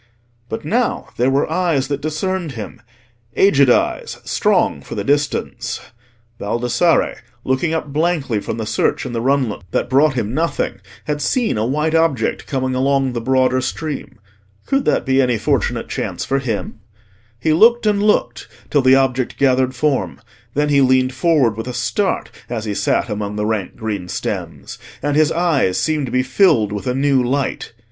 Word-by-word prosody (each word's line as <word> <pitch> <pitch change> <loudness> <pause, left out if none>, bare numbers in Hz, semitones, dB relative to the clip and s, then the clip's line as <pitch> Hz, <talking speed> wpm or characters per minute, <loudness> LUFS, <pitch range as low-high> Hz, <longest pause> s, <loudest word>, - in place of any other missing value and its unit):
But 110 - -5
now 235 +9 0
there 125 +2 +2
were 135 +1 +1
eyes 160 -5 0
that 140 0 -3
discerned 160 +1 -2
him—aged 120 - -1
eyes, - - +1
strong - - +1
for - - -8
the - - -2
distance. 145 +1 -1 0.6
Baldassarre, 120 +10 +1 0.3
looking 145 +6 0
up 150 -3 -4
blankly 150 -8 0
from 110 - -5
the 110 - -3
search 125 - 0
in 125 - -5
the 115 - -2
runlet 130 -4 0
that 120 - -2
brought 135 +1 +4
him 115 -2 -2
nothing, 160 -9 -1 0.3
had 150 -1 -2
seen 240 - +1
a 110 +1 0
white 150 +4 0
object 160 -8 +1
coming 130 -2 -1
along 135 0 +1
the 120 - -3
broader 130 +1 +2
stream. 150 0 -5 0.5
Could 275 0 0
that - - +1
be 135 0 +3
any 125 -3 +1
fortunate - - -1
chance - - -4
for 135 - 0
him? 115 -4 -4 0.6
He 155 +6 +1
looked 230 +7 +5
and 205 -1 +2
looked 210 0 +1 0.2
till 145 - +3
the 130 0 +6
object 130 -2 0
gathered 130 -1 +2
form: 145 0 -1 0.4
then 150 +1 +1
he 140 -1 +4
leaned 130 0 +3
forward 140 -7 +2
with 115 +3 -6
a 125 - -4
start 125 - -1 0.2
as 115 -2 -3
he 105 - -2
sat - - 0
among 105 -2 -4
the 105 0 -1
rank 105 -4 -2
green 105 -6 -4
stems, - - -5 0.2
and 145 0 0
his 155 +1 +3
eyes 160 - +1
seemed 155 -4 0
to - - -6
be 125 0 +2
filled 130 - +3
with 105 +4 -5
a 125 - 0
new 135 -1 +2
light. 135 -1 -2
135 Hz, 170 wpm, -19 LUFS, 120-155 Hz, 0.6 s, the